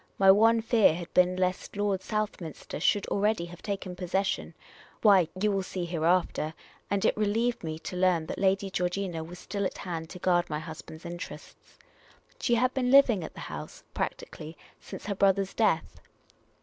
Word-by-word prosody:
My 195 -1 +7
one 225 +3 +5
fear 220 -7 +4
had 170 0 -8
been 180 0 +4
lest 185 +1 -2
Lord 205 -2 0
South 215 -1 -2
minster 160 -3 -7
should 200 +5 +2
already 205 -2 +1
have 175 0 -12
taken 195 -3 -4
possession 190 +2 -2 0.2
— - - -24
why, 195 -6 +6
you 210 +2 +2
will 195 -1 0
see 185 -1 -4
hereafter; 170 -2 0 0.3
and 200 -1 0
it - - +3
relieved 220 +3 0
me 155 -1 -4
to 165 - -7
learn 180 -3 +2
that - - -5
Lady 195 0 +1
Georgina 180 -2 -2
was 175 +2 -10
still 200 +3 -4
at 190 - -2
hand 165 -3 -5
to - - -8
guard 175 -1 +1
my 150 - -2
husband's 160 +1 -9
interests. 175 +1 -9 0.6
She 240 - +2
had 250 +2 +2
been 250 -2 0
living 250 -8 +6
at - - -8
the - - -8
house, - - -8
practically, 155 +1 -5 0.2
since - - -9
her 205 - -1
brother's 195 0 +2
death. 210 -8 0
185 Hz, 180 wpm, -28 LUFS, 175-205 Hz, 0.6 s, My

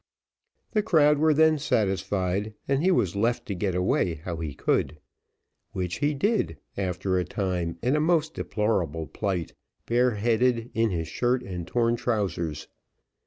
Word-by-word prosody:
The 215 - +2
crowd 150 -7 +4
were 155 +1 +4
then 155 0 +4
satisfied, 100 -3 0
and 135 +1 +1
he 185 - +3
was 100 - +2
left 115 +4 0
to 100 - -3
get 95 0 -1
away 90 -1 +1
how 85 +2 -6
he 80 -4 -5
could, 75 - 0 0.8
which 90 -2 -3
he 145 0 +1
did, 200 - 0 0.2
after 95 -1 -1
a - - 0
time, 90 -5 -2
in 125 +4 +2
a - - +2
most 160 -1 +2
deplorable 90 -8 -1
plight, 95 -2 -3 0.3
bare 120 0 +2
headed, 120 +2 +1
in 115 0 +2
his 85 -4 -2
shirt 125 +9 0
and 90 -5 -6
torn 120 +1 +1
trousers. 95 -10 -2
105 Hz, 155 wpm, -26 LUFS, 90-125 Hz, 0.8 s, crowd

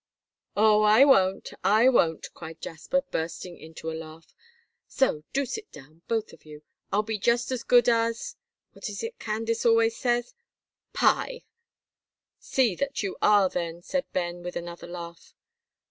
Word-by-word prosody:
"Oh, 215 0 +5
I 215 +5 +6
won't, 195 -9 +3
I 220 +4 +5
won't," 165 -11 +2
cried 160 0 -10
Jasper, 225 +12 -2
bursting 170 +2 -4
into 160 0 -7
a - - -5
laugh, 160 0 -10 0.5
"so 265 - +1
do 280 +1 0
sit 425 - -6
down, 155 +4 -15
both 225 -2 -2
of - - -17
you. 150 -1 -12 0.3
I'll 210 +2 +2
be 220 0 -3
just 240 +4 +1
as 255 -2 -2
good 245 -1 +4
as 230 -1 +1 0.4
what - - -7
is - - -6
it 460 +1 -6
Candace 225 +1 -2
always 230 -1 +4
says 240 0 -1 0.6
pie!" - - +1 1.0
"See 250 -6 +1
that 280 -4 -2
you 195 - -3
are 205 -2 +5
then," 170 -1 -4
said 275 +6 -3
Ben, 175 -1 -2
with 175 0 -6
another 170 0 -6
laugh. 170 -1 -9
210 Hz, 155 wpm, -27 LUFS, 170-240 Hz, 1.0 s, I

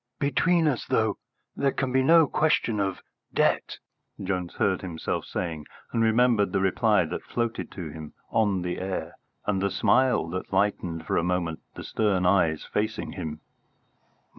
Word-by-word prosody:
"Between 160 +4 +2
us, 135 -5 -1
though, 110 -2 +1 0.4
there 140 -1 +1
can 130 -1 -2
be 130 +1 +3
no 165 +4 +6
question 150 -8 +1
of 95 -2 -2 0.3
debt," - - +1 0.4
Jones 90 -2 -3
heard 95 -2 +1
himself 85 -4 -3
saying, 80 -4 -4 0.2
and 115 - 0
remembered 115 -3 +3
the - - +2
reply 95 -2 +3
that - - -4
floated 115 -1 -3
to 85 -5 -6
him 80 -1 -9 0.2
on 100 -5 +2
the 90 0 -3
air 95 0 -4 0.3
and 100 -2 0
the 100 - +1
smile 125 +4 +3
that 95 +2 -5
lightened 95 -4 0
for - - 0
a - - +2
moment 90 -2 -1 0.2
the - - -7
stern 100 -5 +1
eyes 85 -4 +2
facing 110 +1 -2
him. 80 -4 -6
100 Hz, 160 wpm, -26 LUFS, 90-120 Hz, 0.4 s, no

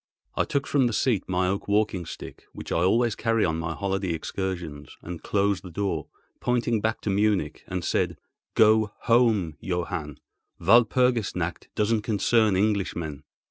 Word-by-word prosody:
I - - +1
took 140 0 -1
from 135 -4 +2
the 120 - -2
seat 110 -3 0
my 90 0 +1
oak 100 +2 -2
walking 100 -4 +1
stick—which - - -9
I - - +1
always 115 +6 +3
carry 115 -1 +1
on 80 -2 -1
my 80 0 -3
holiday 95 -2 -1
excursions—and 85 -2 -5
closed 100 -1 +1
the 90 - -9
door, 85 -3 -2 0.3
pointing 120 -3 0
back 110 +1 -1
to 105 - -1
Munich, 100 -6 0
and 90 -3 -3
said, - - 0 0.4
"Go 110 -1 +4
home, 110 - +2
Johann—Walpurgis 100 - 0
nacht 85 -1 -3
doesn't 105 +1 +1
concern 110 0 +2
Englishmen." 90 -7 -1
100 Hz, 140 wpm, -26 LUFS, 85-110 Hz, 0.4 s, Go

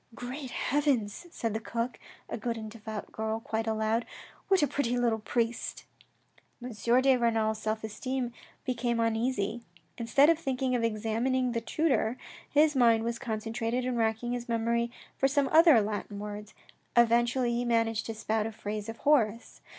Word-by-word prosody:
" - - -14
Great 255 +3 -6
heavens! 275 -2 0
" - - -32
said 230 -8 -2
the 220 - -1
cook, 230 +1 -3 0.3
a - - -4
good 235 0 -3
and 220 -1 -7
devout 220 -1 -7
girl, 220 0 -2
quite 225 0 -3
aloud, 220 +1 +1 0.4
"what 385 -5 +4
a - - +4
pretty 245 -2 0
little 235 -2 +1
priest! 230 +1 -2 0.4
" - - -34
M. 250 - -5
de 250 +5 +3
Renal's 225 -2 +1
self 220 0 -2
esteem 245 +3 -3 0.3
became 240 -2 -1
uneasy. 230 -1 0 0.4
Instead 255 +5 +4
of 330 0 +4
thinking 265 -4 -1
of 240 -2 +1
examining 230 +4 0
the 230 -1 -1
tutor, 255 -3 +1 0.3
his 300 0 +4
mind 230 -3 +4
was 235 0 -2
concentrated 230 +1 -2
in 255 -1 -1
racking 225 +1 0
his 245 -1 -4
memory 235 +1 +1 0.3
for 270 - +4
some 280 0 +2
other 320 -6 +7
Latin 205 -1 -3
words. 210 0 -7 0.4
Eventully 235 +1 +3
he 240 +1 0
managed 230 -2 +1
to 225 - -4
spout 220 0 -1
a - - -5
phrase 210 0 -5
of 225 - -6
Horace. 235 -6 +1
235 Hz, 170 wpm, -29 LUFS, 220-250 Hz, 0.4 s, other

